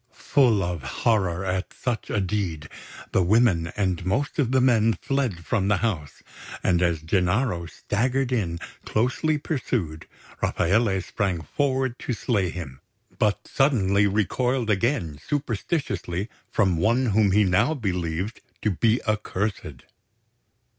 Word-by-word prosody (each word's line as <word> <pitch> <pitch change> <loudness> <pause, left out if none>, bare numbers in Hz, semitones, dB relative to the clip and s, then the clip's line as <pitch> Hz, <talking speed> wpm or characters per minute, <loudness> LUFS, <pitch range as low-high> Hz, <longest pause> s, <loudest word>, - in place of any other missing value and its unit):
Full 120 -8 +5
of 85 -2 -3
horror 95 - 0
at 95 0 -2
such 120 -3 -3
a 105 - 0
deed, 90 -6 -2 0.4
the - - +3
women 95 -3 +3
and 95 -4 0
most 135 - -1
of 130 -4 +2
the 130 - +4
men 115 -3 +4
fled 125 -12 -1
from 100 -6 0
the 100 -1 +3
house; 90 -10 -3 0.4
and 90 -2 +2
as 85 -3 +1
Gennaro 90 +2 +1
staggered 125 +9 -1
in, 95 -9 0 0.3
closely 125 +7 +1
pursued, 120 - -3 0.3
Rafaele 95 +1 +1
sprang 95 -3 -2
forward 130 - -1
to 125 - -3
slay 105 -5 0
him, 75 -7 -7 0.4
but 105 -4 +1
suddenly 100 -8 +3
recoiled 115 +4 0
again 95 - 0
superstitiously 120 - -2 0.2
from 95 -6 +2
one 115 +10 +2
whom 105 -2 +3
he 105 +2 +5
now 95 - +2
believed 90 - -3 0.2
to 105 - +2
be 110 +6 +2
accursed. 105 -2 -2
105 Hz, 130 wpm, -25 LUFS, 90-120 Hz, 0.4 s, Full